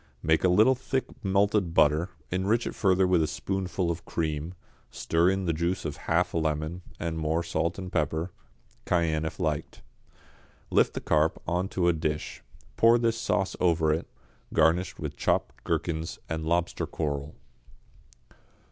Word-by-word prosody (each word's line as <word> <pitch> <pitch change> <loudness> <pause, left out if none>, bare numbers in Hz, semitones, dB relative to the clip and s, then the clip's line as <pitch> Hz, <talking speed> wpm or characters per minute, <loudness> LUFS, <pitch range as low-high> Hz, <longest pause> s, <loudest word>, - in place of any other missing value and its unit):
Make 80 +1 +3
a - - +5
little 110 +8 +5
thick 130 +1 -2 0.2
melted 100 -2 +2
butter, 75 +4 +4 0.2
enrich 100 +6 +1
it - - -3
further 95 -2 +3
with 90 -2 +3
a 80 - +1
spoonful 95 +2 -2
of 85 0 -5
cream, 80 +1 -3 0.3
stir 85 +2 +1
in 95 0 0
the 85 - +1
juice 85 +4 -1
of 75 - -4
half - - +2
a 85 - +1
lemon, 80 +2 -2 0.2
and 80 -1 -3
more 80 +2 0
salt 85 0 -1
and 90 -2 -6
pepper 80 +2 -1 0.5
cayenne 80 -3 +1
if 80 - -5
liked. - - -2 0.9
Lift - - +3
the - - -3
carp 80 +1 +2
on 90 +3 0
to 90 -2 0
a 85 - +4
dish, 75 -1 -3 0.4
pour 115 +1 +6
this 115 -1 +1
sauce 95 -3 0
over 80 -3 +3
it, 80 - -3 0.5
garnish 80 +3 +3
with - - -5
chopped 65 -2 -1
gherkins 80 -1 -2
and 80 -1 -3
lobster 85 +1 0
coral. 75 -1 -3
85 Hz, 155 wpm, -28 LUFS, 80-95 Hz, 0.9 s, pour